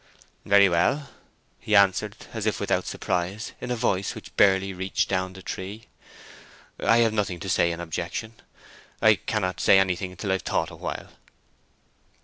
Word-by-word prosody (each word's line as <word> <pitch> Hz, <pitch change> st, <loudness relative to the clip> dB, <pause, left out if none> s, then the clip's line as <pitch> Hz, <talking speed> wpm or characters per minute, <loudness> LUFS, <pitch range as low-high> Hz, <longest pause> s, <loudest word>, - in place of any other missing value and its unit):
"Very 100 Hz, -1 st, +6 dB
well," 125 Hz, -, +1 dB, 0.5 s
he 105 Hz, -, 0 dB
answered, 100 Hz, -2 st, +3 dB, 0.2 s
as -, -, -3 dB
if -, -, 0 dB
without -, -, 0 dB
surprise, 90 Hz, +5 st, -2 dB
in -, -, -5 dB
a 125 Hz, -, 0 dB
voice 100 Hz, -4 st, -1 dB
which -, -, -11 dB
barely 95 Hz, -1 st, +3 dB
reached 95 Hz, +1 st, -1 dB
down 95 Hz, -1 st, -1 dB
the 95 Hz, 0 st, -12 dB
tree. 100 Hz, +4 st, -7 dB, 0.9 s
"I 115 Hz, -, +4 dB
have 110 Hz, -, 0 dB
nothing 100 Hz, -5 st, -1 dB
to 95 Hz, -, -7 dB
say 85 Hz, -2 st, +2 dB
in 85 Hz, -, -5 dB
objection—I 100 Hz, +6 st, -2 dB
cannot 95 Hz, -3 st, -2 dB
say 95 Hz, -, +6 dB
anything 95 Hz, -1 st, 0 dB
till 100 Hz, 0 st, -2 dB
I've 95 Hz, -, 0 dB
thought -, -, -1 dB
a -, -, -10 dB
while." -, -, -6 dB
95 Hz, 155 wpm, -25 LUFS, 90-105 Hz, 0.9 s, Very